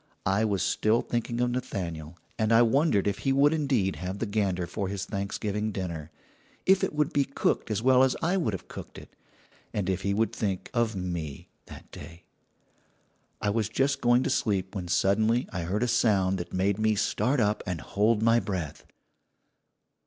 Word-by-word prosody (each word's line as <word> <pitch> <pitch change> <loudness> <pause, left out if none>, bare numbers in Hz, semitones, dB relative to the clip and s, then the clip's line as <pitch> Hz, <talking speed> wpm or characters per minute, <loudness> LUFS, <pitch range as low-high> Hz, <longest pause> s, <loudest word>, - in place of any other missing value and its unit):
I 100 +4 +2
was 100 -3 0
thinking 120 +2 +1
of 125 0 +1
Nathaniel, 85 -10 -4 0.2
and 110 0 +1
I 115 +1 +7
wondered 120 - +2
if 100 - -1
he 135 - 0
would 140 +3 +4
indeed 135 -11 0
have 95 +2 -4
the 115 - -2
gander 100 -4 0
for 95 +3 -3
his 95 0 -4
Thanksgiving 105 +1 -3
dinner, 85 -6 -5 0.6
if 190 0 +4
it - - 0
would 150 +1 +1
be 140 - +3
cooked 140 -3 -1
as 110 +1 -1
well 130 0 +5
as 130 -1 +3
I 175 +3 +1
would 140 - 0
have 95 - -6
cooked - - -9
it, - - -13 0.6
and 100 -3 -1
if 95 +1 -2
he 100 +1 0
would 110 +2 +1
think 95 -4 -3
of 115 -3 +1
me 85 -6 -5 0.2
that - - -12
day. 80 +2 -11 1.2
"I 105 -2 +1
was 110 0 0
just 135 +4 0
going 120 +1 +4
to - - -1
sleep 95 -3 0
when 90 -3 -4
suddenly 110 +7 +2
I 90 -3 -3
heard 100 +7 -1
a - - +1
sound 100 -6 +2
that 85 - -6
made 95 +2 0
me 110 0 +2
start 125 +6 +1
up 105 -1 +1
and 90 -3 -2
hold 105 +2 +1
my 115 +1 +5
breath. 90 -10 -4
105 Hz, 185 wpm, -27 LUFS, 95-120 Hz, 1.2 s, I